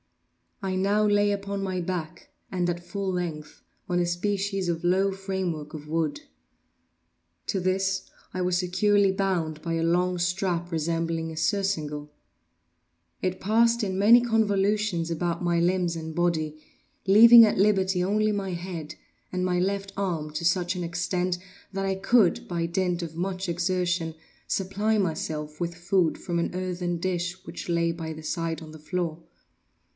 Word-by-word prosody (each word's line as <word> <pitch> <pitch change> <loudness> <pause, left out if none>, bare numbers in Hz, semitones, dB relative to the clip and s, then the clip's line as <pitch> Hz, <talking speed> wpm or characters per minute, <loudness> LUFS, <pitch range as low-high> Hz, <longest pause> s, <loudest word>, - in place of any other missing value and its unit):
I 190 -1 -1
now 200 +3 +2
lay 205 0 +3
upon 200 0 -3
my 185 -1 -2
back, 170 -2 -5 0.2
and 180 -2 0
at 175 0 -6
full 195 +1 -3
length, 165 -4 -4 0.3
on 175 0 +1
a 175 - +2
species 195 +2 -1
of 170 0 -2
low 190 +3 +3
framework 190 -6 -4
of 150 -1 -9
wood. 160 -1 -1 1.3
To 195 - 0
this 185 +1 0 0.3
I 185 - -2
was 180 0 +1
securely 195 +2 +3
bound 180 -5 -1
by 165 0 -2
a 165 0 0
long 180 +2 +2
strap 175 -1 -1
resembling 165 0 -1
a 160 - -9
surcingle. 155 -5 -1 1.1
It 185 0 -1
passed 230 +3 +3
in 190 -2 -1
many 225 +5 +7
convolutions 210 -5 +1
about 170 +1 -2
my 170 -1 +2
limbs 175 0 +1
and 160 -1 -6
body, 160 -3 0 0.5
leaving 230 +4 +9
at 210 - 0
liberty 190 -2 +3
only 215 +3 +2
my 200 -2 -2
head, 170 -3 -6 0.4
and 185 0 -1
my 180 -1 +1
left 195 +1 -1
arm 170 -6 -2
to 155 +2 -3
such 175 +2 +2
extent 180 +1 -1 0.4
that 195 0 -2
I 195 - +1
could, 195 0 +3
by 170 -1 -1
dint 180 0 0
of 160 -1 -7
much 185 +2 -3
exertion, 175 -1 0 0.3
supply 205 +3 0
myself 155 -4 -3
with 170 -1 -2
food 175 -1 +1
from 175 -1 -3
an 170 - -1
earthen 180 -1 -2
dish 180 +1 -3
which - - -7
lay 170 0 +2
by 165 -1 -5
my 155 - -9
side 165 +1 -3
on 155 - -10
the 155 - -11
floor. 165 0 -3
180 Hz, 155 wpm, -26 LUFS, 170-195 Hz, 1.3 s, leaving